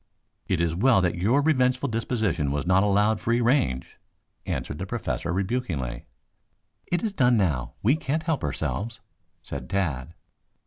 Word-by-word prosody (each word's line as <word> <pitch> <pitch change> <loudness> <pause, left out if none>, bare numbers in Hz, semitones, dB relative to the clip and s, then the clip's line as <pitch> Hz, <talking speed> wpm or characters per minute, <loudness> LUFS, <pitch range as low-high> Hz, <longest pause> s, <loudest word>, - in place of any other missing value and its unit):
"It 95 - 0
is 85 -1 +1
well 115 +3 +4
that 90 -2 +1
your 115 +11 +2
revengeful 130 -3 +2
disposition 110 - 0
was 75 +3 -1
not 95 +2 +4
allowed 105 +1 +2
free 115 +1 +1
range," 120 - +1 0.5
answered - - -3
the - - -4
Professor 85 - -3
rebukingly. 90 - -2 0.8
"It 175 +5 -1
is 215 -3 -1
done 125 -8 +4
now. 70 - 0
We 125 +8 +4
can't 155 +1 -2
help 160 -3 -1
ourselves," 100 - -3 0.4
said 70 -1 -7
Tad. 80 -6 -2
105 Hz, 145 wpm, -26 LUFS, 85-125 Hz, 0.8 s, well